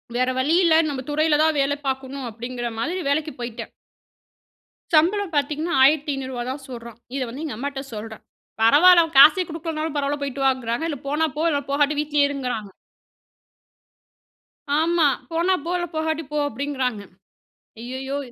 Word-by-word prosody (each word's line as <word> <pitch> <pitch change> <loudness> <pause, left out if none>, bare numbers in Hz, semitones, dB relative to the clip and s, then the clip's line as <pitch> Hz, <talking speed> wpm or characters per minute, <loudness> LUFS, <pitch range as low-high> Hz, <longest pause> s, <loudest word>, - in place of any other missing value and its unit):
வேற 255 +1 +1
வழி 285 +6 +2
இல்ல. 330 -2 +4
நம்ம 265 -2 -4
துறையில 305 0 +2
தான் 315 -1 +2
வேலை 280 +1 +1
பார்க்கணும் 265 0 -4
அப்படிங்கிற 240 +2 -5
மாதிரி 340 +10 -2
வேலைக்கு 310 +2 0
போய்ட்டேன். 235 -1 -6 1.2
சம்பளம் 360 +4 +3
பார்த்தீங்கன்னா, 300 +4 -1
1,500 275 -2 +2
ரூபாய் 245 0 -4
தான் 270 +1 -7
சொல்றான். 235 -2 -9 0.2
இதை 270 - -1
வந்து 265 +7 -7
எங்க 295 - -5
அம்மாட்ட 275 +2 -4
சொல்றேன். 220 0 -8 0.4
பரவாயில்ல 340 +10 +7
அவன் 320 -3 -7
காசே 315 +6 +8
குடுக்கலன்னாலும் 320 -1 -4
பரவாயில்ல. 285 0 -1
போய்ட்டு 275 0 -3
வாங்கிறாங்க. 255 +1 -1
இல்ல 285 -5 -4
போனா 300 +3 +1
போ 315 - 0 0.3
போகாட்ட 290 +1 +2
வீட்டிலயே 295 -1 +2
இருங்கிறாங்க. 250 -7 -4 2.1
ஆமா 330 -1 +3 0.2
போனா 340 +3 +1
இல்ல 350 +3 -2
போகாட்டி 315 0 -1
போ 300 - -2
அப்படிங்கிறாங்க. 260 -3 -3 0.8
ஐய்யய்யோ 260 +3 -5
285 Hz, 140 wpm, -23 LUFS, 255-315 Hz, 2.1 s, காசே